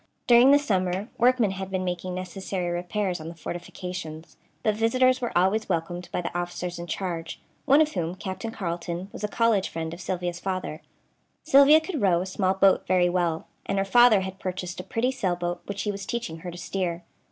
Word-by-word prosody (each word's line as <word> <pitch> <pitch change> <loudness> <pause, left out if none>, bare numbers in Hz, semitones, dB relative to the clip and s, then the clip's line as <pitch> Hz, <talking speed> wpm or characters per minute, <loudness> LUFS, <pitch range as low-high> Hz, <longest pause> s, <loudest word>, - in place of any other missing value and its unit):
During 245 +2 +7
the 285 - +8
summer 190 -5 -1
workmen 245 -4 +4
had 190 0 -5
been 185 -1 -2
making 180 0 -3
necessary 185 0 -4
repairs 180 0 -2
on 155 - -7
the 170 - -7
fortifications; 175 -1 -7 0.3
but 215 - +3
visitors 255 +4 +3
were 240 -7 -1
always 190 +5 +2
welcomed 175 +2 -2
by - - -1
the 175 - -5
officers 175 0 -3
in 170 - -6
charge, 170 -1 -4 0.3
one 285 +2 +6
of 310 -1 +2
whom, 170 -3 -2
Captain 190 +2 -5
Carleton, 175 -2 -4
was - - -8
a - - +1
college 215 -2 +2
friend 160 0 -4
of 170 - -8
Sylvia's 175 -1 -3
father. 185 -5 -4 0.6
Sylvia 280 +3 +7
could 320 -2 -4
row 180 -4 +4
a 180 - -2
small 190 0 0
boat 190 0 +4
very 180 -1 +3
well, 175 -2 0 0.2
and 195 - -1
her 195 - +1
father 235 0 +6
had 190 0 -6
purchased 180 -1 -4
a - - -4
pretty 250 +4 0
sailboat 175 -7 -2
which 200 -1 -3
he 210 - 0
was 195 -1 -7
teaching 230 -9 -4
her 180 +2 -6
to 175 - -8
steer. 175 -1 -3
185 Hz, 200 wpm, -26 LUFS, 175-215 Hz, 0.6 s, the